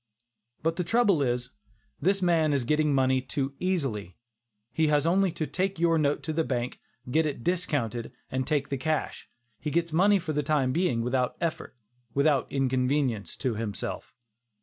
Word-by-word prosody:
But 165 +1 0
the 180 - 0
trouble 200 -3 +3
is, 125 -1 -1 0.5
this 195 +4 +2
man 165 -4 +3
is 140 -3 +1
getting 150 +4 +2
money 130 -1 +3
too 135 +1 -3
easily. 135 - -2 0.6
He 160 -1 +2
has 150 0 +2
only 185 +2 +3
to 165 -2 -2
take 185 +6 -1
your 165 -1 +3
note 145 -1 +1
to 160 - -3
the 160 +1 +1
bank, 125 -4 -3 0.3
get 160 +3 +3
it 140 -5 -5
discounted 145 - -1 0.2
and 130 0 -1
take 145 -2 0
the 140 - -1
cash. 155 +2 -2 0.3
He 150 - -3
gets 170 +1 0
money 200 +5 +5
for 165 -4 -3
the 150 - +1
time 140 -3 +1
being 165 -7 +1
without 125 +1 0
effort; 165 -5 -3 0.4
without 140 -1 +2
inconvenience 130 -3 0
to 130 -4 -1
himself. 105 -2 -5
150 Hz, 170 wpm, -28 LUFS, 130-165 Hz, 0.6 s, money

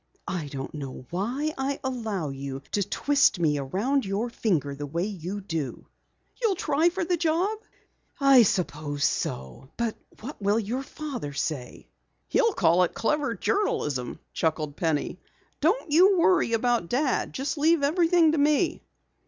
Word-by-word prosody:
"I 170 -5 -3
don't 135 -1 -6
know 135 -4 -7
why 250 - -1
I 270 +1 -1
allow 220 - -2
you 135 0 -6
to 205 - +1
twist 280 +5 +2
me 150 -4 +2
around 215 - 0
your 205 +5 -2
finger 160 -12 0
the 145 +1 -6
way 170 +5 -1
you 200 0 -5
do." 160 -8 -4 0.6
"You'll 440 -5 +2
try 325 -3 +2
for 360 0 -3
the 350 0 +1
job?" 350 +7 0 0.6
"I 275 -2 +7
suppose 150 -8 0
so. 65 - -2
But 235 -2 -1 0.3
what 255 +1 -8
will 200 +2 +2
your 230 +4 -2
father 270 - -6
say?" 140 -3 -4 0.4
"He'll 460 -3 +3
call 170 - +3
it 180 - +1
clever 280 0 0
journalism," 150 - -1 0.2
chuckled 155 -2 -1
Penny. 160 -3 -1 0.4
"Don't 340 +2 +1
you 370 +5 +6
worry 340 -8 +3
about 230 -5 +1
Dad. 260 +2 0
Just 280 +3 -3
leave 320 0 +3
everything 335 +1 +4
to 310 - 0
me." 295 +1 +2
230 Hz, 150 wpm, -26 LUFS, -, 0.6 s, I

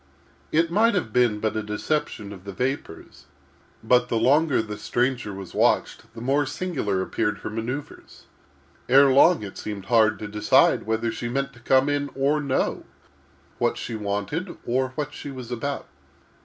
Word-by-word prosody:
_ - - -33 0.5
It 165 +2 +2
might 225 +4 +3
have 115 - -2
been 120 -4 +3
but 110 0 -1
a 110 - 0
deception 105 -1 -3
of 95 -2 -12
the 100 - -7
vapors, 125 -6 -5 0.6
but, 125 +2 +3
the 115 - +1
longer 140 +6 +3
the 105 -1 -6
stranger 125 -2 -1
was 95 -1 -8
watched 110 - +1
the 115 - -8
more 135 +3 +1
singular 140 - -2
appeared 105 +1 -1
her - - -5
manoeuvres. 120 +6 -6 0.7
Ere 135 +2 +7
long 160 +1 +5
it 100 - -8
seemed 105 -2 -6
hard 110 -1 +3
to 105 - -6
decide 105 0 +3
whether 110 +1 0
she 120 - -4
meant 135 +2 -2
to 120 - -16
come 130 +3 +3
in 145 0 0
or 145 +3 +1
no—what 140 -2 -4
she - - -5
wanted, 105 - -3
or 130 +2 0
what 145 0 -3
she 145 - -7
was 130 -3 -8
about. 140 +4 -3
125 Hz, 170 wpm, -24 LUFS, 105-140 Hz, 0.7 s, Ere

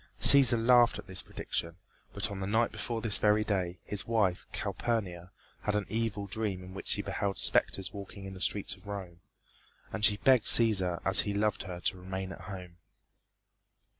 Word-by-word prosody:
Cæsar 130 -4 +7
laughed 120 -1 +4
at - - -10
this 95 -1 -4
prediction, 85 -2 -6 0.4
but - - -3
on 100 - -6
the 95 - -4
night 110 +3 0
before 115 -2 -5
this 110 -3 +4
very 105 0 +2
day, 95 -4 -3
his 105 - -2
wife, 105 -6 -1
Calpurnia, 90 -7 -4 0.3
had 105 - -2
an 105 -1 -1
evil 110 -3 -3
dream 100 -2 -4
in 90 0 -12
which 95 - -9
she - - -1
beheld 100 -1 -3
specters 95 -1 +1
walking 100 -1 -10
in 95 - -8
the 95 - -11
streets 100 0 +1
of - - -15
Rome; 95 -4 -8 0.7
and 105 - -5
she 105 -1 +4
begged 130 -1 +3
Cæsar 95 -7 +6
as 95 - +3
he 100 -1 -1
loved 105 -1 -1
her 90 -2 -8
to 95 - -1
remain 95 +1 -6
at - - -11
home. 90 -3 -10
100 Hz, 185 wpm, -29 LUFS, 95-110 Hz, 0.7 s, Cæsar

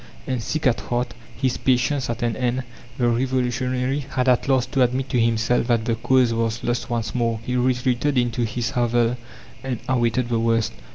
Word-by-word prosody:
And, 130 -2 -2
sick 155 +7 -3
at 125 -3 +3
heart, 120 0 -2 0.2
his 130 0 0
patience 130 +1 +1
at 120 0 -3
an 115 -2 0
end, 125 0 -1 0.3
the 120 - +2
revolutionary 125 +2 0
had 130 0 -1
at 125 +1 +3
last 130 -1 +2
to 135 - +1
admit 130 +2 +1
to 125 - +1
himself 115 +1 +1
that 115 -3 +1
the 115 - +1
cause 120 +1 +2
was 115 0 -1
lost 120 +1 -1
once 115 -2 -2
more. 115 -2 0
He 125 - -2
retreated 125 +2 +1
into 120 0 +1
his 115 +3 -2
hovel 120 -2 +1 0.5
and 130 -2 -2
awaited 120 -1 +1
the 115 -1 +1
worst. 115 -1 +1
120 Hz, 185 wpm, -23 LUFS, 115-130 Hz, 0.5 s, at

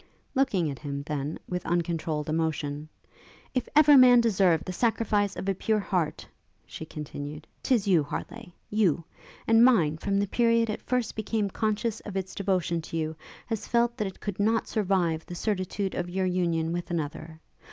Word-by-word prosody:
Looking 205 - +1
at 135 - -8
him, 140 -1 -5
then, 150 0 -3
with 180 -1 -3
uncontrolled 165 -3 -1
emotion, 155 -2 -2 0.6
'If 255 -2 -1
ever 300 -1 +8
man 250 -1 +8
deserved 190 -8 +3
the 185 - -4
sacrifice 210 -2 +1
of - - -5
a 195 - +2
pure 215 +3 0
heart,' 180 -6 -1 0.4
she 160 - -8
continued, 150 0 -7 0.2
''tis 235 -6 +2
you, 180 -5 +5
Harleigh, 195 +8 -6 0.2
you! 190 -6 +2 0.4
and 225 +1 +5
mine, 165 -12 +4
from 200 +2 0
the 200 - +2
period 230 +1 +2
it 215 - -5
first 250 -2 -1
became 215 -2 -1
conscious 215 +1 -1
of 200 -2 -6
its 190 0 -4
devotion 180 -4 0
to 165 - -6
you, 160 0 -2 0.3
has 225 -3 -4
felt 235 0 +2
that 215 -4 -1
it 190 - -9
could 205 -2 -5
not 220 +2 +2
survive 180 -6 0
the 175 - -7
certitude 195 0 -2
of 175 - -3
your 190 +1 -1
union 170 -3 0
with 175 0 -4
another. 160 -1 -4
185 Hz, 175 wpm, -27 LUFS, 160-220 Hz, 0.6 s, ever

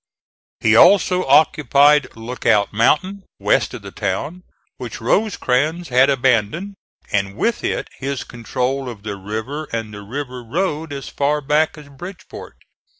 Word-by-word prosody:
He 110 -1 +4
also 185 - +5
occupied 145 0 +4
Lookout 115 -3 0
Mountain, 170 - +2 0.2
west - - +1
of - - -10
the - - -8
town, 180 +4 -3 0.4
which 125 -3 -7
Rosecrans 160 - 0
had 130 +2 +4
abandoned, 130 - +1 0.4
and 100 0 -1
with 230 -1 0
it - - -2
his 140 0 -3
control 125 +2 -3
of 110 -4 -10
the 105 -2 -4
river 110 +10 -5
and 115 -5 -5
the 105 - -8
river 125 +3 -6
road 160 +3 -2
as 140 -1 -6
far 145 +1 0
back 150 +3 +1
as 150 -1 -12
Bridgeport. 175 +7 -10
135 Hz, 140 wpm, -20 LUFS, 115-155 Hz, 0.4 s, also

